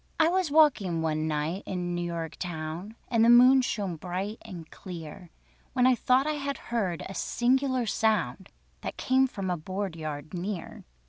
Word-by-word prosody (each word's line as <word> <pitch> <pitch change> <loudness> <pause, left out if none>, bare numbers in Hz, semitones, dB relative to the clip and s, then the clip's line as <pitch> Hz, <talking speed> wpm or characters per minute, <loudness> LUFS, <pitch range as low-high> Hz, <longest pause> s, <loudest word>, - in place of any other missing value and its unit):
I 320 0 +5
was 370 -2 +1
walking 235 - +3
one 155 0 0
night 155 +5 -1
in 180 -2 -2
New 175 - -2
York 170 -2 -4
town, 170 +4 -5
And 230 -2 +3
the 230 - +6
moon 250 +2 +8
shone 200 -8 -2
bright 185 +6 -4
and 170 -3 -9
clear, 175 -2 -9 0.4
When 250 -1 +3
I 255 - +6
thought 255 +2 +3
I 305 0 -1
heard 235 - -2
a 195 - -7
singular 255 +3 +1
sound 200 - 0 0.3
That - - -5
came 265 +1 +3
from 195 -7 -4
a 175 - -1
board 185 +2 -4
yard 155 -1 -6
near. 180 0 -5
190 Hz, 170 wpm, -28 LUFS, 170-250 Hz, 0.4 s, moon